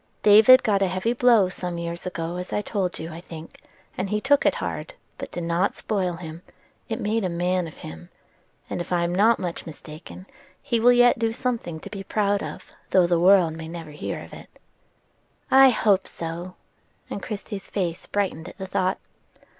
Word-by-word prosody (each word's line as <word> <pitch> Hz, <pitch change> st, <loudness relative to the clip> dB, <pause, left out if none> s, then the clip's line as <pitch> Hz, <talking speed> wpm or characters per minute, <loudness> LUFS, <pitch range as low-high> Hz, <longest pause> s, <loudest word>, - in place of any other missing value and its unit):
David 220 Hz, +5 st, +8 dB
got 200 Hz, -2 st, +2 dB
a 195 Hz, -, +3 dB
heavy 185 Hz, +6 st, -1 dB
blow 235 Hz, -5 st, +4 dB
some 180 Hz, -1 st, -5 dB
years 170 Hz, +1 st, -5 dB
ago 170 Hz, -1 st, -4 dB
as 180 Hz, 0 st, -6 dB
I 210 Hz, -, -1 dB
told 190 Hz, -5 st, -2 dB
you, 160 Hz, +1 st, -7 dB
I 165 Hz, -, -8 dB
think; 165 Hz, -2 st, -11 dB, 0.4 s
and 190 Hz, +1 st, -3 dB
he 210 Hz, +1 st, 0 dB
took 275 Hz, +5 st, +3 dB
it -, -, +2 dB
hard, -, -, -5 dB, 0.2 s
but -, -, -5 dB
it -, -, -35 dB
did 175 Hz, -, -4 dB
not 170 Hz, +4 st, 0 dB
spoil 190 Hz, -5 st, -1 dB
him: 165 Hz, -1 st, -8 dB, 0.5 s
it 225 Hz, +1 st, -3 dB
made 220 Hz, 0 st, 0 dB
a 185 Hz, -, 0 dB
man 180 Hz, +1 st, 0 dB
of 160 Hz, -, -12 dB
him; 80 Hz, +2 st, -10 dB, 0.6 s
and, -, -, -4 dB
if 175 Hz, -, -8 dB
I 175 Hz, -1 st, +2 dB
am 170 Hz, 0 st, -1 dB
not 215 Hz, +5 st, +4 dB
much 175 Hz, -2 st, -5 dB
mistaken, 160 Hz, +3 st, -11 dB, 0.3 s
he 235 Hz, -, -1 dB
will 245 Hz, +2 st, +6 dB
yet 245 Hz, -1 st, +5 dB
do 225 Hz, -1 st, +1 dB
something 230 Hz, -9 st, -3 dB
to -, -, -9 dB
be 195 Hz, -2 st, -6 dB
proud 205 Hz, 0 st, 0 dB
of, -, -, -8 dB, 0.2 s
though 185 Hz, -2 st, +5 dB
the 175 Hz, -1 st, +2 dB
world 180 Hz, -2 st, +5 dB
may 160 Hz, 0 st, -7 dB
never 165 Hz, -2 st, -8 dB
hear 150 Hz, -, -5 dB
of -, -, -13 dB
it." -, -, -11 dB, 1.0 s
"I 270 Hz, 0 st, +8 dB
hope 205 Hz, -5 st, +2 dB
so!" 170 Hz, +2 st, -6 dB, 0.6 s
and 200 Hz, -, -4 dB
Christie's 205 Hz, -1 st, -6 dB
face 175 Hz, -4 st, -3 dB
brightened 185 Hz, -5 st, -2 dB
at -, -, -15 dB
the 190 Hz, -, -5 dB
thought. 185 Hz, 0 st, 0 dB
185 Hz, 200 wpm, -24 LUFS, 170-210 Hz, 1.0 s, David